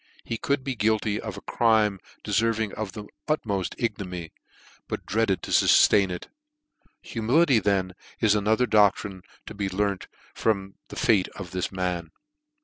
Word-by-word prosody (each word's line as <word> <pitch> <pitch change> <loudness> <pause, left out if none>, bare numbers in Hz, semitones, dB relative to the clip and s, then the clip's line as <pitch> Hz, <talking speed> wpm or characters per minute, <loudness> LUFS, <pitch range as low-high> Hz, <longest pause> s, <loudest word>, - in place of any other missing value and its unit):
He 115 - -4
could 140 -1 0
be 135 -1 -2
guilty 110 -1 +1
of 110 -4 -6
a - - -8
crime 110 -4 +2 0.2
deferving 110 -1 +1
the 105 -1 -5 0.2
utmoft 100 - -1
ignominy, 90 -8 -4 0.5
but - - -5
dreaded 110 -3 0
to - - -6
fuftain 100 -2 +5
it. 90 -1 -6 0.8
Humility, 130 -1 +3
then, 95 -2 0 0.3
is 110 -2 +4
ano 105 +1 +2
ther 125 - +2
doctrine 100 -3 +2 0.2
to - - -8
be 100 -1 -2
learned 100 0 -1 0.3
from 100 -3 -1
the - - -10
fate 105 -5 +3
of 90 -4 -8
this 90 -1 -2
man. 90 -3 -2
105 Hz, 145 wpm, -26 LUFS, 95-110 Hz, 0.8 s, fuftain